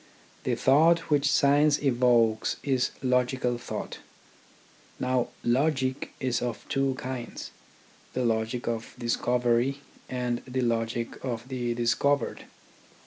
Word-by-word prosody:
The - - +1
thought 160 +5 +4
which 145 0 +3
science 145 +1 +4
evokes 120 -4 +2
is 130 -3 +1
logical 125 -1 +1
thought. - - -6 1.0
Now 130 -1 +1 0.2
logic 130 +1 0
is 125 -2 0
of 120 -2 -4
two 135 -2 +1
kinds: 125 -2 -6 0.6
the 130 -1 -1
logic 115 +1 -1
of 115 -1 -3
discovery 120 +2 +1 0.3
and 125 -1 -2
the 130 0 -1
logic 115 0 -2
of 120 -2 -4
the 120 -2 -2
discovered. 140 +4 +1
125 Hz, 110 wpm, -27 LUFS, 120-135 Hz, 1.0 s, thought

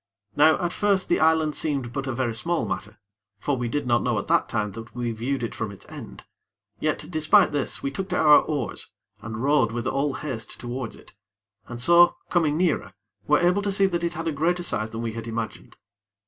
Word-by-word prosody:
Now 155 +2 +5
at 175 - -2
first 200 -3 +1
the - - +3
island 160 -1 +3
seemed 135 -6 -2
but 135 +1 -3
a - - -1
very 120 -2 -1
small 170 +10 -1
matter; 105 +2 -5 0.4
for 140 +7 -1
we 120 -2 -2
did 145 +3 -2
not 120 -1 +2
know - - 0
at - - -3
that - - +3
time 105 -1 -1
that 115 +3 -10
we 120 -1 -2
viewed 120 +3 -2
it 115 - -3
from 115 - -3
its 100 - -13
end; - - -10 0.6
yet 155 0 -1
despite 155 +5 +4
this, 145 -2 -2
we 140 - -1
took 190 +7 -4
to - - 0
our 150 -1 +7
oars 145 -6 -3 0.3
and 110 +2 -5
rowed 140 -5 +3
with 120 +1 -4
all 135 +1 0
haste 130 -7 -6
towards 120 0 -5
it, - - -17 0.5
and 120 -1 -7
so, 170 +7 +6 0.2
coming 155 -4 +2
nearer, 175 -3 0 0.3
were 150 - +5
able 180 +3 +2
to 200 0 -1
see 195 0 +3
that 175 -3 -1
it 170 0 -1
had 165 0 -4
a - - +1
greater 170 +4 0
size 110 -10 -2
than 115 +1 -5
we 115 -1 -3
had 115 0 -6
imagined. 115 -1 -5
140 Hz, 215 wpm, -25 LUFS, 115-165 Hz, 0.6 s, our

